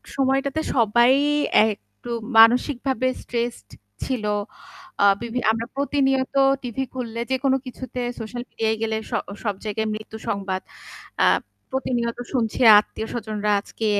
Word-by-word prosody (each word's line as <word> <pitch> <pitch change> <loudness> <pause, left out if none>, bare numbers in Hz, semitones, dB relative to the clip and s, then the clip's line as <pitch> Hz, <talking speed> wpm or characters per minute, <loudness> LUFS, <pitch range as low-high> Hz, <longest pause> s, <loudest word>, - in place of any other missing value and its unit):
সময়টাতে 275 +3 +1
সবাই 235 +2 +4 0.6
একটু 215 +3 -12 0.3
মানসিকভাবে 255 +3 +4
stressed 235 - -4 0.4
ছিল। 250 -5 -2 0.8
আ - - +5 0.2
বিভি 235 +1 -3
আমরা 225 +1 -2
প্রতিনিয়ত 270 -1 +1 0.3
TV 240 -1 -6 0.2
খুললে, 235 -2 -4
যেকোনো 265 0 +2
কিছুতে, 255 0 -6 0.2
সোশ্যাল 240 +2 -5
মিডিয়ায় 220 0 -1
গেলে 220 -1 0
স - - -17 0.3
সব 205 -3 -1
জায়গায় 220 +1 -2
মৃত্যু 215 +1 -7
সংবাদ। 190 -2 -2 0.6
আ - - +6 0.5
প্রতিনিয়ত 240 -3 -1 0.2
শুনছি 235 0 -1 0.2
আত্মীয়স্বজনরা 215 -1 -3
আজকে 220 - -6
235 Hz, 115 wpm, -23 LUFS, 220-260 Hz, 0.8 s, আ